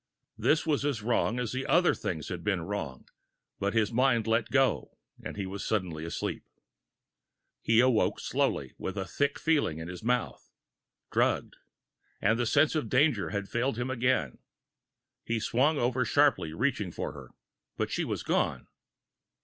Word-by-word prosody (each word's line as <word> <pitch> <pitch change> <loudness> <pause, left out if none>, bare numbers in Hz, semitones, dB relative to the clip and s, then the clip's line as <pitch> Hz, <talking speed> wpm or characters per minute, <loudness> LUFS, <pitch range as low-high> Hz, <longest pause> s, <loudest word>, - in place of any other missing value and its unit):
This 160 +2 +2
was 150 -3 +1
as 140 -7 -1
wrong 120 +1 +1
as 125 -3 -2
the 130 +1 -3
other 175 +1 +4
things 80 -4 -4
had 90 -2 -5
been 95 -5 0
wrong 80 -10 -5 0.5
but 100 +3 -1
his 110 -2 +2
mind 120 -2 +3
let 115 0 +1
go, 135 -2 +1 0.3
and - - -6
he 100 - -2
was 95 +1 -5
suddenly 90 -7 -2
asleep. 85 - -4 1.2
He 115 +1 +4
awoke 125 -3 +2
slowly, - - -1
with 95 - -4
a 95 - -2
thick 140 +7 -1
feeling 150 - +1
in 80 0 -6
his 90 0 -7
mouth. 125 +1 -1 0.6
Drugged! - - +1 0.6
And 115 +3 +2
the 120 - +1
sense 155 - +4
of 155 -2 -1
danger 135 -6 +3
had 100 -1 -3
failed 120 +2 -1
him 120 +2 -2
again! 125 - 0 0.8
He 115 0 -1
swung 135 +8 +2
over 125 0 +1
sharply, 140 - +3
reaching 105 - -1
for - - -4
her, - - -11 0.5
but - - -1
she - - 0
was - - -3
gone. - - 0
115 Hz, 160 wpm, -29 LUFS, 100-130 Hz, 1.2 s, other